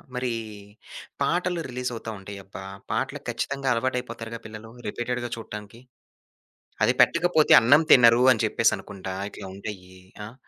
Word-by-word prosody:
మరీ 125 -1 -1 0.9
పాటలు 175 0 0
రిలీజవుతా 125 -2 -4
ఉంటాయి. 100 +1 -9
అబ్బా! 95 0 -9 0.3
పాటలకి 135 +1 -3
ఖచ్చితంగా 135 +3 -2
అలవాటయిపోతారుగా 115 -2 -3
పిల్లలు 110 +1 -10 0.2
రిపీటెడ్‌గా 120 +2 -3
చూడటానికి. 105 +1 -9 1.0
అది - - +4
పెట్టకపోతే 170 -2 +3
అన్నం 140 +7 +5
తినరు 120 -1 +7
అని 110 - -1
చెప్పేసనుకుంటా 95 -1 -1 0.2
ఇట్లా - - -9
ఉంటాయి 100 -2 -7 0.4
ఆ! 115 - -10
120 Hz, 115 wpm, -25 LUFS, 110-130 Hz, 1.0 s, తినరు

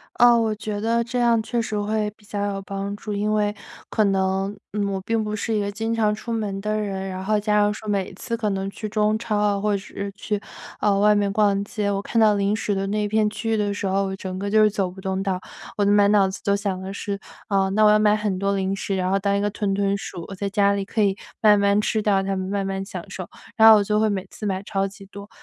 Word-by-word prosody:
呃， 240 0 +6
我 220 -1 +1
觉 210 -1 -4
得 230 +2 +1
这 245 +2 -3
样 235 -1 +4
确 235 +2 -1
实 215 -2 -3
会 210 0 -1
比 210 - -24
较 205 0 -3
有 195 - -5
帮 195 +1 -4
助。 210 0 -6
因 210 +1 0
为 210 -1 +1 0.4
可 215 - +2
能， 195 0 0 0.2
嗯， 205 -1 -1
我 190 - -2
并 225 +2 0
不 210 0 -3
是 225 +2 -2
一 210 - +1
个 200 0 -2
经 225 +2 -2
常 215 -2 +2
出 230 +2 -6
门 205 -3 -2
的 215 +1 -1
人， 195 -2 -3
然 185 0 -5
后 215 +1 +2
加 210 0 +1
上 205 0 +3
说 215 +1 -9
每 195 -2 -1
次 230 +5 -4
可 215 -2 -1
能 195 0 -2
去 215 +2 -6
中 215 0 +1
超， 210 -2 0
或 210 +1 +1
者 - - 0
是 200 0 -6
去， 210 0 -2 0.4
呃， 200 -1 +2
外 210 +1 +5
面 205 -1 +1
逛 200 -1 +2
街， 205 0 -3
我 195 -1 -1
看 230 - 0
到 215 -1 +5
零 200 0 +1
食 205 -1 -1
的 195 - -1
那 210 +1 0
片 215 0 +2
区 225 +1 -4
域 220 - +2
的 205 -1 0
时 200 0 -3
候， 195 +1 +1
我 190 - -4
整 185 -1 -6
个 200 +1 -3
就 215 +1 +4
是 215 - +6
走 195 -3 -1
不 190 +1 -11
动 190 0 -2
道。 190 -2 -1 0.4
我 205 - +2
的 200 - +3
满 205 0 +5
脑 200 -2 +4
子 190 +1 -7
都 200 0 +2
想 200 -2 -3
的 190 +1 -6
是， 200 0 -4 0.3
呃， 195 -2 +2
那 215 +2 +3
我 210 - +7
要 210 - +5
买 210 0 +4
很 210 -3 -2
多 200 +1 0
零 190 0 -1
食， 195 0 -2
然 185 -1 0
后 195 - +2
当 200 0 +1
一 - - 0
个 205 - +1
屯 205 -1 -2
屯 200 0 +1
鼠， 175 -3 -7
我 195 - -7
在 200 +1 -3
家 200 0 +3
里 200 -1 -1
可 215 - -3
以 195 -1 +2 0.2
慢 210 -2 +6
慢 200 +1 +3
吃 215 +1 0
掉 200 -2 +2
它 195 - -1
们， 190 -1 -3
慢 200 0 -1
慢 195 0 -3
享 195 - -7
受， - - -6 0.3
然 225 0 +8
后 220 - +9
我 205 - +2
就 210 +1 +1
会 220 - +3
每 195 -2 -2
次 210 - -7
买 190 -1 -1
超 195 0 -1
级 195 +1 -13
多。 200 +1 -11
205 Hz, 300 characters per minute, -23 LUFS, 195-215 Hz, 0.4 s, 后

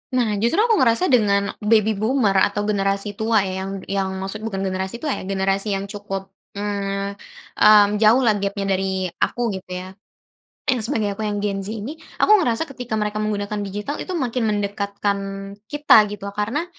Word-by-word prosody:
Nah, 220 -5 +1
justru 235 - +2
aku 455 -1 +4
ngerasa 245 +3 +3
dengan 210 -6 +4 0.2
baby 215 0 +2
boomer 215 -2 +2
atau 205 0 -2
generasi 200 0 -1
tua 220 -1 +2
ya 190 0 -3
yang 195 - -5 0.2
yang 195 -1 0
maksud 210 +3 -5
bukan 195 -3 -3
generasi 190 +1 -2
tua 310 - -2
ya, - - -6
generasi 195 +1 0
yang 195 0 -2
cukup, 195 -1 -5 0.2
mmm 200 -1 -3 0.4
mmm, 210 -1 +7
jauh 220 +4 +5
lah 215 -5 +3
gap-nya 200 0 -2
dari 190 -1 -1
aku 245 - -1 0.2
gitu 185 - -13
ya, 180 0 -5 0.8
yang 255 - +1
sebagai 220 -2 0
aku 215 - -1
yang 205 -1 -2
gen 200 -1 -1
Z 195 - -6
ini. 260 +10 -6 0.2
Aku - - +3
ngerasa 240 -6 +1
ketika 250 -6 -5
mereka 210 0 -1
menggunakan 210 -1 -2
digital 205 +7 -4
itu 370 - -4
makin 250 -6 -1
mendekatkan 200 -1 -1 0.5
kita 290 -8 +5
gitu 205 -1 -8
loh, 200 - -4
karena 235 +10 0
205 Hz, 180 wpm, -22 LUFS, 195-225 Hz, 0.8 s, mmm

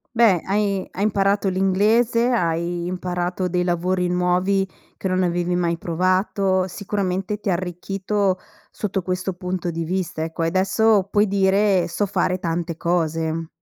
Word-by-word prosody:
Beh, 220 -7 +5
hai 200 -1 0
hai 195 - -3
imparato 200 -1 +2
l'inglese, 210 +6 +2
hai 170 -4 0
imparato 180 0 -2
dei 180 0 0
lavori 180 +1 0
nuovi 180 +2 +1 0.3
che - - -3
non 185 0 +1
avevi 175 0 0
mai 170 -1 0
provato, 185 +2 +1
sicuramente 195 +1 -2
ti 205 - -3
ha - - +3
arricchito 185 +2 -1 0.3
sotto 195 -2 -3
questo 185 +1 -2
punto 180 -1 -3
di 165 0 -3
vista, 180 -2 -2
ecco, 165 +1 -3
e - - +2
adesso 195 +3 +3
puoi 205 +1 +3
dire: 195 -1 +3
"So 205 +4 -1
fare 185 -1 0
tante 170 -1 -2
cose". 165 -1 -1
185 Hz, 145 wpm, -22 LUFS, 175-195 Hz, 0.3 s, Beh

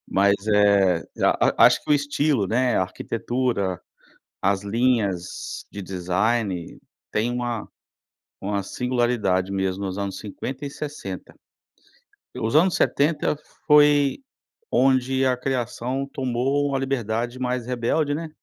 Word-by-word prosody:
Mas, 100 +1 +3
eh, 100 -4 +4 0.2
a - - +3
a - - +11
acho - - +3
que - - -6
o - - +7
estilo, 145 -5 +1
né, 125 +5 +1
a - - +3
arquitetura, 110 0 -2 0.6
as 100 0 +1
linhas 100 -5 -1
de 100 - -7
design 95 +1 -1 0.3
tem 110 +3 0
uma 120 -2 -3 0.7
uma 100 0 -2
singularidade 120 -5 0
mesmo 95 0 -1
nos 95 -1 -3
anos 100 -1 -3
50 130 +7 -6
e 140 - -5
60, 140 -12 -7 1.0
os 110 +5 -1
anos 175 +4 +5
70 150 +1 +1 0.3
foi 145 -2 +5 0.5
onde 130 0 +3
a 130 -1 +3
criação 130 +1 -2
tomou 135 +3 0
uma 135 -1 0
liberdade 120 -2 -2
mais 125 -1 -2
rebelde, 125 +5 0
né, 160 0 -5
120 Hz, 125 wpm, -24 LUFS, 100-135 Hz, 1.0 s, a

